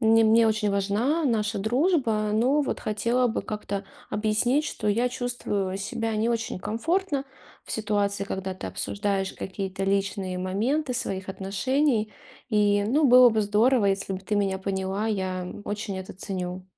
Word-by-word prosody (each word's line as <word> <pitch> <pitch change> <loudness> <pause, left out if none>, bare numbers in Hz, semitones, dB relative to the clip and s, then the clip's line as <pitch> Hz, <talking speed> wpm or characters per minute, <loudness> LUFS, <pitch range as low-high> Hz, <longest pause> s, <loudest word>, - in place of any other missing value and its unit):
Мне 225 -1 +5
мне 225 +1 +5
очень 215 -1 +1
важна 215 +11 +1
наша 215 -4 0
дружба. 230 - +1
Но 255 +7 +3
вот - - -2
хотела 235 +4 +1
бы 230 - -2
как-то 200 -2 -4 0.2
объяснить, 220 +7 +1
что 220 -7 -4
я 235 +4 +2
чувствую 240 -6 -2
себя 220 +3 -2
не 220 +2 +1
очень 225 -5 -2
комфортно 285 - -1 0.4
в - - -6
ситуации, 205 -2 0
когда 190 -1 -4
ты 140 - -6
обсуждаешь 190 - -2
какие-то 195 0 -5
личные 195 -1 -1
моменты 245 +10 -1
своих 190 -5 -3
отношений. 215 +5 0 0.4
И, 205 -1 +3
ну, 295 +7 +2
было 250 -2 +8
бы 220 -1 +1
здорово, 215 +2 +3
если 195 0 0
бы 190 - -4
ты 210 +2 -2
меня 195 -2 0
поняла, 195 +2 -2
я 185 -3 -2 0.2
очень 205 -2 -4
это 190 - -7
ценю. 185 -1 -5
210 Hz, 155 wpm, -26 LUFS, 195-235 Hz, 0.4 s, было